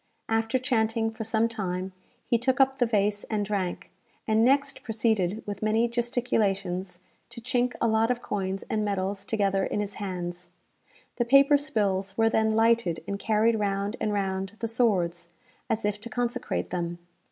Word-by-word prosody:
After 225 +3 +1
chanting 225 -3 0
for 225 0 -6
some 225 +1 +1
time, 190 -4 -3 0.3
he 235 - +2
took 255 +2 +1
up 270 +1 +3
the 245 - +3
vase 205 -2 +1
and 210 -2 -1
drank; 195 -4 -3 0.4
and 220 0 +3
next 275 +3 +2
proceeded, 220 -3 0
with 205 -1 -5
many 220 +2 +2
gesticulations, 200 -7 -1 0.3
to 235 0 -9
chink 245 0 0
a 235 - +2
lot 220 +1 +2
of 250 -1 +1
coins 195 -1 -3
and 215 -1 -1
medals 200 -1 -2
together 195 -3 +1
in - - -1
his 205 -1 -3
hands. 180 -2 -5 0.7
The 240 - +1
paper 275 +3 +6
spills 200 -8 0
were 225 0 +3
then 220 0 +2
lighted 225 -8 +2
and 200 0 -3
carried 220 +1 +2
round 200 +1 -1
and 210 - 0
round 195 -1 -2
the 230 - -3
swords, 185 -8 +1 0.4
as 220 -1 0
if 205 0 -1
to 235 - -6
consecrate 245 +1 -2
them. 175 -1 -2
215 Hz, 165 wpm, -27 LUFS, 195-235 Hz, 0.7 s, paper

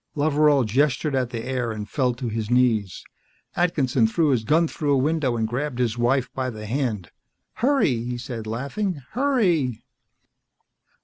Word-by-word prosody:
Loveral 145 -2 +3
gestured 140 +6 +1
at 130 -2 0
the 115 -2 -5
air 125 -3 -2
and 105 -1 -5
fell 125 0 0
to 125 0 -5
his 110 -1 -3
knees. 115 -6 +1 0.5
Atkinson 140 -9 +2
threw 155 +7 +1
his 125 -5 +1
gun 160 +7 +3
through 150 -2 -2
a - - +3
window 135 -3 +1
and 110 -1 0
grabbed 125 +3 -3
his 120 -3 0
wife 125 +2 0
by 130 -1 -2
the 110 -3 -8
hand. 110 - -2 0.5
"Hurry!" 235 - +2
he 120 0 -4
said, 120 -3 -6
laughing. 140 - -3
"Hurry!" 190 - +1
130 Hz, 160 wpm, -24 LUFS, 115-150 Hz, 0.5 s, Loveral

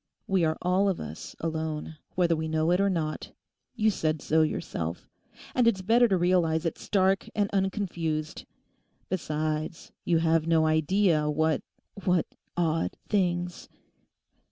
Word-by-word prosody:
We 190 -3 +1
are 160 0 0
all 185 +3 +3
of 190 - -1
us 75 +1 -8
alone, 160 -1 -3 0.2
whether 175 -2 +3
we 160 0 -3
know 160 +1 +1
it 180 +2 +3
or 200 - +3
not; 160 -4 -3 0.4
you 220 -2 +3
said 155 -4 -1
so 160 +3 +2
yourself. 85 - -2 0.5
And 245 -2 +3
it's 195 -5 +2
better 235 +4 +5
to 195 -4 +2
realize 175 -2 +2
it 165 - -2
stark 195 -1 +1
and 205 -1 +1
unconfused. 175 -6 -2 0.6
Besides, 155 -2 -3
you 170 - +2
have 165 0 +2
no 160 -1 +4
idea 155 0 +2
what—what 160 +4 -1 0.3
odd 165 -2 0
things.... 180 -3 -1
165 Hz, 135 wpm, -28 LUFS, 155-190 Hz, 0.6 s, better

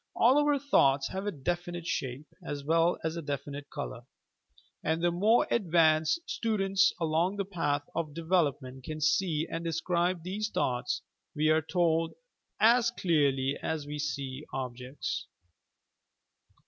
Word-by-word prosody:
All 255 +5 +5
our 295 -1 +3
thoughts 140 - +3
have 190 +2 -4
a - - +1
definite 175 +3 -3
shape 130 -2 -3 0.2
as 145 -1 -5
well 165 +3 +3
as 160 0 -1
a 170 - -3
definite 145 -1 -5
colour, 140 -5 -6 0.8
and 160 +1 0
tbe 175 -1 +3
more 215 +7 +4
advanced 165 - +3
stu 225 -2 -1
dents 195 0 +3
along 165 +4 +1
the 200 -1 -2
Path 145 -7 -1
of 155 -3 -3
Development 145 -7 0
can 155 +3 -5
see 155 +1 +1
and 165 0 -4
de 165 - -1
scribe 175 +1 0
these 205 +4 -3
thoughts, 125 -10 -1 0.3
we 155 +1 +2
are 155 0 +4
told, 165 0 +1 0.4
as 235 +1 +5
clearly 145 - +1
as 155 -2 -2
we 150 0 -5
see 140 -1 -3
objects. 130 +1 -4
160 Hz, 145 wpm, -30 LUFS, 145-185 Hz, 0.8 s, All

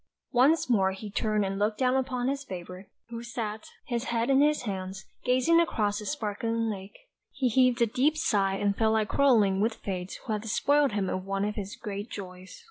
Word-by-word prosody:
Once 280 +6 +4
more 195 -6 +2
he 205 +2 -8
turned 215 0 0
and 195 0 -3
looked 210 +1 +1
down 255 +1 +2
upon 255 -1 -1
his 275 +1 -1
favourite, 185 -2 -8 0.2
who 235 -1 -6
sat, 225 -2 -5 0.2
his 240 0 -2
head 235 +2 0
in 270 +1 +5
his 300 -2 +2
hands, 190 -3 -5 0.2
gazing 255 +7 +4
across 210 -10 +1
the 210 - -7
sparkling 230 -3 -1
lake; 195 -1 -8 0.3
he 265 -3 0
heaved 250 0 +3
a - - +5
deep 265 +7 +1
sigh 200 -10 +1
and 200 0 0
felt 220 0 +2
like 220 -1 +1
quarrelling 215 -9 +3
with 220 +1 +1
Fate 185 -2 -5
who 225 - -2
had 210 - -2
despoiled 280 +4 +2
him 200 -2 0
of 185 0 -2
one 195 0 -1
of 210 - -2
his 205 -1 -6
great 205 0 -6
joys. 185 -1 -9
220 Hz, 205 wpm, -28 LUFS, 200-250 Hz, 0.3 s, in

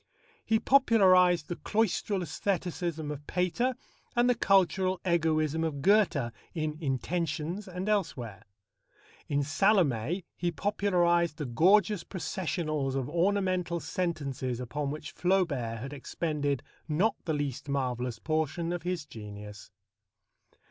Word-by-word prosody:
He 220 - +2
popularized 185 - +5
the 175 - -4
cloistral 210 -2 0
æstheticism 170 -2 -2
of 150 0 -8
Pater 210 +9 0 0.4
and 240 0 +4
the 250 - +5
cultural 190 -3 +2
egoism 160 -2 +1
of 145 -4 -3
Goethe 180 - +3 0.2
in 155 -2 -2
Intentions 160 - -2
and 185 +1 -5
elsewhere. 130 - -2 0.8
In 145 0 +1
Salomé 160 - +2
he 175 - -1
popularized 175 -2 +1
the 150 - -3
gorgeous 185 - +3
processionals 155 -6 -2
of 135 -2 -1
ornamental 180 -1 +1
sentences 140 - -3
upon 140 +4 -3
which 150 +2 -6
Flaubert 165 -12 0
had 135 +5 -6
expended 145 0 -2 0.2
not 180 +8 +2
the 160 - 0
least 145 -2 -3
marvellous 125 -3 -1
portion 160 +2 -1
of 175 - -3
his 175 -2 -3
genius. 105 -2 -10
165 Hz, 115 wpm, -29 LUFS, 140-185 Hz, 0.8 s, popularized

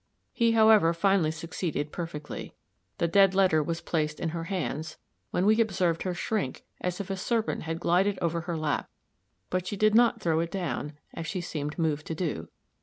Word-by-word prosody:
He, 230 -2 +3
however, 220 -6 +6
finally 190 -2 +3
succeeded 160 -2 -3
perfectly. 160 -4 -6 0.4
The 170 - +1
dead 195 +2 +5
letter 185 -5 +4
was 165 +2 -3
placed 155 -3 -1
in 165 - -1
her 165 0 -4
hands, 165 -4 -3 0.3
when 180 - 0
we 220 +2 +5
observed 180 -6 +1
her 185 -2 -2
shrink 195 -7 -2 0.2
as 180 +1 -3
if 200 -1 -4
a - - 0
serpent 225 +4 -1
had 165 +1 -3
glided 185 +4 +2
over 170 0 0
her 170 0 -3
lap; 155 -2 -1 0.6
but 185 0 -1
she 205 - -3
did 215 +1 +4
not 235 0 +5
throw 165 -5 +1
it 165 0 -1
down, 170 -5 -3 0.2
as 165 - -5
she 185 - -2
seemed 150 -3 -4
moved 155 -2 0
to 160 - -3
do. 155 - -3
170 Hz, 185 wpm, -28 LUFS, 160-195 Hz, 0.6 s, however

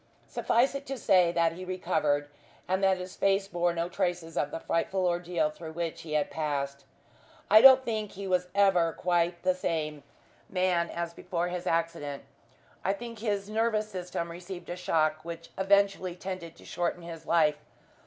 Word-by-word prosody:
Suffice 245 +4 +2
it 275 0 -6
to 270 0 -3
say 180 -6 +4
that 170 -1 +2
he 180 +3 -8
recovered, 170 -6 0 0.4
and 190 +1 0
that 190 -1 +4
his 180 0 -7
face 195 0 +2
bore 175 -2 +1
no 170 0 -2
traces 175 -3 -2
of 145 - 0
the - - -5
frightful 185 +3 0
ordeal 175 -3 0
through 160 0 -9
which 165 0 -3
he 155 -2 -7
had 150 -1 +1
passed. 140 -3 -3 0.7
I 215 +1 +9
don't 265 0 +9
think 215 -3 -2
he 200 +1 -7
was 180 -1 +1
ever 180 -5 +4
quite 175 -1 0
the 185 0 +3
same 155 -4 -2 0.5
man 180 -2 +1
as 170 0 -4
before 175 0 -2
his 175 0 -4
accident. 165 -4 -1 0.6
I 195 - +2
think 230 +1 -8
his 205 -3 -1
nervous 215 0 0
system 180 -3 -4
received 175 0 -8
a - - -3
shock 155 -3 +1
which 170 0 -8
eventually 195 -2 +2
tended 185 -3 -6
to - - -16
shorten 175 0 -2
his 165 -1 -9
life. 150 -3 +3
175 Hz, 175 wpm, -29 LUFS, 165-195 Hz, 0.7 s, I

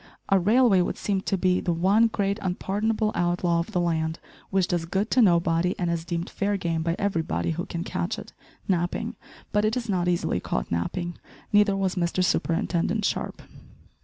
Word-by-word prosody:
A 195 - +5
railway 210 0 +4
would 175 - -2
seem 195 -2 -1
to 195 - -1
be 185 0 +2
the 175 - 0
one 195 +7 +4
great 200 -1 -1
unpardonable 210 +4 0
outlaw 175 -1 +1
of 170 - -3
the 180 - 0
land, 160 -2 0 0.3
which 190 -2 +2
does 175 -4 -1
good 195 +6 -1
to 255 - +4
nobody, 170 -2 +3
and 175 -2 0
is 165 -1 -2
deemed 170 0 -3
fair 200 0 -1
game 170 -3 -1
by 165 +1 0
everybody 170 -4 -1
who 170 +2 -4
can 170 0 -4
catch 85 - -3
it - - -10 0.3
napping. 190 +6 -1 0.4
But 210 0 +2
it 215 +3 +1
is 240 -2 -3
not 180 -4 0
easily 175 -1 +1
caught - - -3
napping. 170 - -2 0.3
Neither 205 -1 +5
was 190 -2 0
Mr 180 0 0
Superintendent 180 +4 0
Sharp. - - -2
180 Hz, 185 wpm, -26 LUFS, 170-200 Hz, 0.4 s, A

